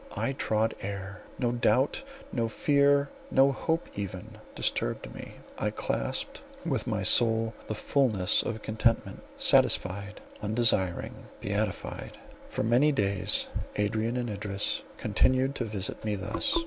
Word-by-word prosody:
I 135 - -1
trod 110 -3 0
air; 100 +1 -6 0.2
no 120 -2 0
doubt, 120 - +2 0.3
no 115 -2 0
fear, 140 +3 +3 0.2
no 135 +1 +5
hope 160 +5 -1
even, 95 -3 -6 0.2
disturbed - - -1
me; - - -9 0.2
I - - +1
clasped - - -3 0.2
with - - -1
my - - -1
soul 115 -1 +4
the 110 - -3
fulness 110 -7 +2
of 110 -1 -4
contentment, 110 +1 0 0.2
satisfied, 100 +3 +3 0.2
undesiring, 105 -4 +1 0.3
beatified. 100 0 -3 0.3
For - - -2
many 120 +7 +4
days 100 -7 +2 0.3
Adrian 110 +3 0
and 120 -1 -2
Idris 105 -2 -2 0.2
continued 130 +1 +2
to 125 - -3
visit 105 -4 -4
me 105 -1 -1
thus. 105 - +1
110 Hz, 125 wpm, -29 LUFS, 100-125 Hz, 0.3 s, no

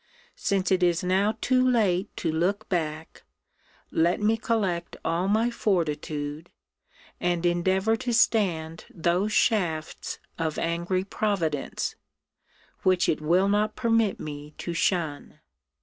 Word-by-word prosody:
Since 195 -1 0
it 185 -1 +3
is 175 -1 +2
now 195 +4 +1
too 255 0 +3
late 205 -7 +2
to 165 - -1
look 180 +6 0
back, 160 -3 -3 0.7
let 170 +2 +2
me 215 +2 +3
collect 195 -7 -1
all 170 +3 0
my 220 +4 +2
fortitude, 155 -6 -2 0.7
and 175 -1 0
endeavour 190 +5 +2
to 245 - -3
stand 175 -9 +1
those 180 +1 0
shafts 175 -9 0 0.2
of 160 -2 -1
angry 170 +2 -1
Providence, 190 -8 -1 0.9
which 185 -1 +3
it 155 - 0
will 175 +5 +3
not 210 +1 +1
permit 225 -4 +1
me 150 0 -7
to 175 - -4
shun! 165 -4 -1
180 Hz, 120 wpm, -26 LUFS, 165-205 Hz, 0.9 s, it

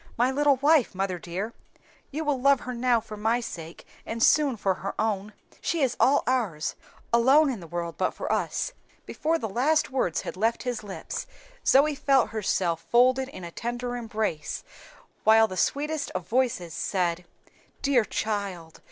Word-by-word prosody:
"My 245 +3 +3
little 285 +1 +3
wife, 285 -4 +3
mother 190 -2 -2
dear 190 +7 -5 0.6
you 310 +3 -4
will 280 -3 0
love 275 0 +4
her 250 - -5
now 240 0 +2
for 215 -1 -9
my 220 +3 +1
sake, 165 -8 -8 0.2
and 230 +1 -2
soon 285 -6 +4
for 195 -1 +1
her 195 +2 -6
own. 210 -1 -1 0.3
She 330 -4 0
is 255 -2 +1
all 280 +2 +4
ours 210 -13 0 0.4
alone 270 +5 +5
in 235 - -5
the 170 - -10
world 170 0 -4
but - - +2
for - - -3
us." - - -1 0.3
Before 325 +2 0
the 230 - -3
last 275 +9 +1
words 215 - 0
had - - -6
left 225 +5 0
his 245 -3 -2
lips 200 -2 -6 0.4
Zoe 290 +3 +5
felt 275 -2 +2
herself 185 -6 -1
folded 255 +2 +4
in 185 - -10
a 170 - -7
tender 240 +4 -4
embrace, 220 -10 -3 0.6
while 220 0 +6
the 185 - -7
sweetest 295 +7 -1
of 180 -2 -3
voices 230 -8 0
said, 175 0 -1 0.6
"Dear 275 -4 +4
child! 200 -7 -4
230 Hz, 170 wpm, -26 LUFS, 190-265 Hz, 0.6 s, while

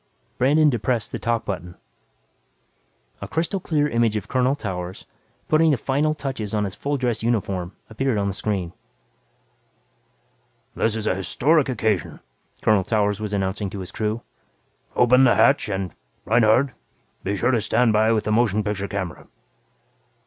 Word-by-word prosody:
Brandon 150 +5 +4
depressed 120 -3 0
the - - -4
"talk" 115 -1 -1
button. 90 -2 -5 1.5
A - - -5
crystal 170 +5 -1
clear 150 -4 0
image 115 -4 +1
of 105 - -3
Colonel 130 +1 +1
Towers, 90 -7 -5 0.4
putting 160 +1 +4
the 145 - +3
finishing 145 +6 0
touches 125 -8 -4
on 105 - +1
his 100 -2 -3
full 145 +7 -2
dress 125 -3 -1
uniform, 95 -6 -1
appeared 120 +1 -1
on 100 - 0
the 100 - -1
screen. 95 -4 -2 2.0
"This 110 -1 0
is 110 -1 -4
an 95 - +1
historic 140 - +2
occasion," 110 - -1 0.4
Colonel 105 -3 +4
Towers 105 -1 0
was 105 -1 -4
announcing 100 0 -1
to 100 - -7
his 95 0 -7
crew. 110 +2 -2 0.7
"Open 125 +2 +5
the 125 - +5
hatch 140 -5 +4
and, 95 -4 -3 0.3
Reinhardt, 115 +4 +4 0.5
be 100 +1 -1
sure 120 +6 +2
to 120 -4 +2
stand 120 +1 +2
by 110 +1 +3
with 110 -2 +1
the 110 - -2
motion 110 -2 +2
picture 100 -1 -2
camera." 95 -4 -5
110 Hz, 155 wpm, -23 LUFS, 100-130 Hz, 2.0 s, Open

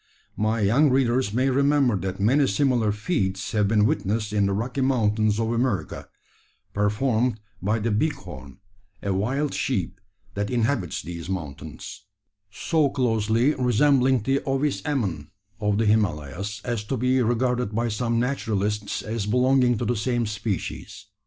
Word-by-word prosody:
My 110 +1 0
young 125 +9 +4
readers 130 -3 +2
may 130 +4 +1
remember 140 -3 +3
that 95 0 -4
many 135 +8 +3
similar 125 -8 +2
feats 100 - -2
have 105 -2 +2
been 105 0 +3
witnessed 105 +1 -1
in 100 -1 +2
the - - 0
Rocky 125 +6 -2
Mountains 110 -5 +1
of 115 0 0
America, 115 -8 -2 0.6
performed 110 +3 +1 0.2
by 105 +5 +1
the 110 +1 -1
"bighorn" 90 - -3 0.5
a 100 - 0
wild 130 +10 -1
sheep 95 -6 -2 0.3
that 100 +1 -2
inhabits 120 - -1
these 85 0 -7
mountains, 75 -6 -6 0.5
so 155 - +1
closely 115 +1 +1
resembling 130 -1 +3
the 135 +4 +1
Ovis 135 +2 -1
ammon 95 - -2 0.3
of 105 -1 0
the 115 - +1
Himalayas, 100 -1 -1
as 120 -4 -2
to 130 +5 -2
be 125 +2 +2
regarded 120 -1 0
by 120 +1 0
some 115 +1 -1
naturalists 105 -5 -1
as 110 -2 -3
belonging 125 +1 +3
to - - -2
the 120 - 0
same 120 +2 0
species. 105 -2 -4
110 Hz, 145 wpm, -24 LUFS, 100-130 Hz, 0.6 s, young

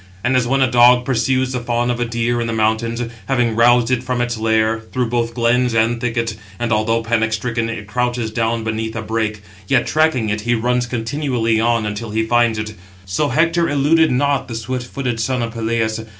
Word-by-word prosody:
And 125 +2 +1
as 125 -2 +2
when 135 +2 +1
a 125 - +1
dog 125 0 +5
pursues 130 +1 +1
the 125 - -2
fawn 120 0 -1
of 120 - -3
a 120 - 0
deer 120 +1 -1
in 115 - -2
the 115 - -2
mountains, 110 +2 0 0.2
having 120 -4 +1
roused 120 +1 +4
it 125 -1 +1
from 125 -1 -2
its 120 -1 -1
lair, 110 0 +1
through 120 +2 -3
both 115 -1 -1
glens 120 0 +2
and 115 +1 +1
thickets; 115 -2 -1 0.2
and, 120 -1 -1
although 115 +2 +1
panic 110 -1 0
stricken, 115 +1 -2
it 110 -2 -5
crouches 120 0 -2
down 115 0 -1
beneath 110 0 -3
a 115 - -4
brake; 110 -2 -2 0.2
yet 125 +1 +2
tracking 155 -8 +1
it, 105 0 -2
he 120 +2 +1
runs 120 +2 0
continually 120 -2 -1
on 115 -1 +1
until 105 +2 -4
he 110 +1 -1
finds 120 -1 +2
it; 110 0 -4 0.3
so 95 +11 0
Hector 165 +4 +2
eluded 150 +3 +3
not 140 +2 +1
the 115 - -6
swift 125 +2 -4
footed 125 -3 -3
son 125 +2 -1
of 115 -1 -4
Peleus. 115 -1 -1
115 Hz, 205 wpm, -18 LUFS, 110-125 Hz, 0.3 s, dog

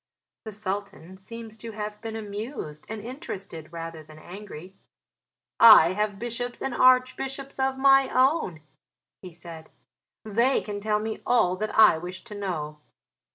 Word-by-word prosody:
The 220 - -6
Sultan 195 -3 -6
seems 225 +3 -9
to 225 0 -8
have 210 0 -6
been 225 -1 -6
amused 205 - -7
and 220 -1 -5
interested 195 - -8
rather 165 -1 -7
than 155 0 -15
angry. 185 0 -10 0.9
"I 185 -7 +9
have 210 0 -1
bishops 240 +2 -5
and 270 - -3
archbishops 260 +2 +2
of 265 0 0
my 270 0 +5
own," 255 - +1 0.6
he 185 - -10
said, 165 -1 -12 0.6
"they 235 +5 +2
can 205 -1 -6
tell 210 +1 0
me 220 0 -5
all 185 -7 +2
that 215 +2 -4
I 215 -7 +7
wish 180 +2 -8
to 235 - -10
know." 160 -7 -4
210 Hz, 145 wpm, -26 LUFS, 180-240 Hz, 0.9 s, I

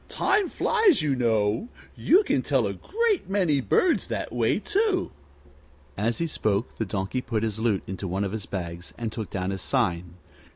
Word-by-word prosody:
Time 400 -2 +1
flies, 410 - +3
you 145 -3 +1
know. 110 - +1 0.3
You 380 +5 +4
can - - +1
tell - - +1
a - - -2
great 435 - -1
many 180 -8 +2
birds 345 - +2
that - - -4
way, - - +2
too." 415 -2 0 0.8
As 115 +4 0
he 170 - 0
spoke 110 -8 -1
the 110 - -1
Donkey 95 +5 -2
put 115 -3 -2
his 110 -1 -2
lute 110 -4 +1
into 95 +1 -5
one 95 +3 -1
of 100 - -2
his 105 -3 -5
bags 85 -2 -6
and 115 -2 -3
took 110 -5 -5
down 95 0 -2
his 95 -2 -4
sign. 85 0 -1
115 Hz, 180 wpm, -26 LUFS, -, 0.8 s, You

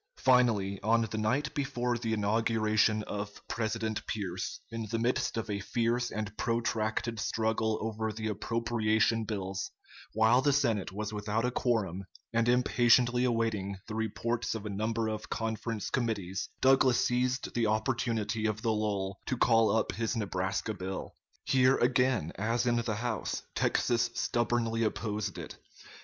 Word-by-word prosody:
Finally, 115 -7 +3
on 115 +2 +3
the 110 0 -4
night 130 +8 0
before 125 -4 -1
the 115 -1 -2
inauguration 110 0 +2
of 105 0 -6
President 110 -1 -2
Pierce, 95 -4 -3
in 115 -1 -4
the 115 - -1
midst 120 0 0
of 115 - -2
a 100 -2 -2
fierce 120 +4 0
and 105 -1 -4
protracted 115 -1 -1
struggle 110 0 0
over 110 0 -2
the 110 0 -4
appropriation 110 0 +1
bills, 95 -3 -3 0.4
while 110 +3 +4
the 145 - +3
Senate 115 -10 +1
was 105 +2 -4
without 105 +2 -1
a 125 - 0
quorum 105 -8 0 0.3
and 115 +1 +2
impatiently 120 +1 +4
awaiting 110 -5 0
the 110 - -6
reports 115 +2 -1
of 110 -1 -5
a 105 - -3
number 110 +3 -1
of 110 -1 -4
conference 110 -3 -3
committees, 105 -7 -2
Douglas 130 -2 +5
seized 125 +1 0
the 115 -2 +1
opportunity 110 -1 0
of 110 +1 -3
the 115 -2 +2
lull 100 -2 -2
to 130 - -1
call 115 -2 +4
up 110 - +1
his 115 +2 -2
Nebraska 95 +1 -1
bill. 95 -1 -5 0.3
Here 130 0 +4
again, 125 - +2
as 115 +3 0
in 120 -1 +2
the 115 -2 -1
House, 120 +3 -3
Texas 120 -1 +1
stubbornly 115 -1 0
opposed 105 -2 -2
it. - - -8
110 Hz, 145 wpm, -30 LUFS, 105-120 Hz, 0.4 s, Douglas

